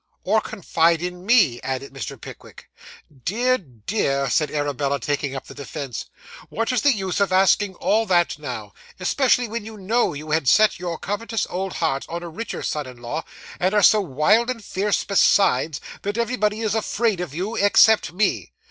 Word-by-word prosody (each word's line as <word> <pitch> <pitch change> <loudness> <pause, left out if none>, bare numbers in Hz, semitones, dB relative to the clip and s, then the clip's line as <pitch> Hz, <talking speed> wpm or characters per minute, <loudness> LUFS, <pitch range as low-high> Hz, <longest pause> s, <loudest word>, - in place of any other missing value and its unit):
'Or 215 +3 +2
confide 165 -4 +1
in 180 +1 -6
me?' 205 - +4
added 135 +1 -4
Mr. 135 -8 -6
Pickwick. - - -13 0.5
'Dear, 250 +7 +1
dear,' 140 - -2
said 150 -2 +2
Arabella, 140 -1 -1
taking 140 +1 -2
up 135 - -6
the - - -11
defence, 140 -3 -6 0.4
'what 230 +3 -1
is 250 - +1
the 290 - +5
use 190 -5 -2
of 200 -2 +1
asking 190 +1 +3
all 220 +4 +1
that 175 -4 +2
now, 120 -8 -6 0.3
especially 245 +5 +2
when 225 0 -5
you 220 0 -9
know 210 -2 0
you 155 +2 -7
had 155 -3 +1
set 215 - +4
your 175 -2 -4
covetous 220 +3 -3
old 190 +1 -3
heart 135 0 -1
on 170 +1 -5
a 170 - -6
richer 225 +8 -6
son 150 -3 -3
in 125 -1 -12
law, 135 +7 -4 0.4
and 185 +3 +1
are 205 - +4
so 210 +2 +6
wild 195 - +2
and 230 -5 -4
fierce 200 +2 0
besides, 165 -7 +3 0.2
that 205 +2 -3
everybody 225 -2 0
is 220 -2 0
afraid 220 -2 0
of 160 -5 -6
you, 195 +7 -3
except 205 -3 +4
me? 195 +4 -1
185 Hz, 180 wpm, -22 LUFS, 145-215 Hz, 0.5 s, so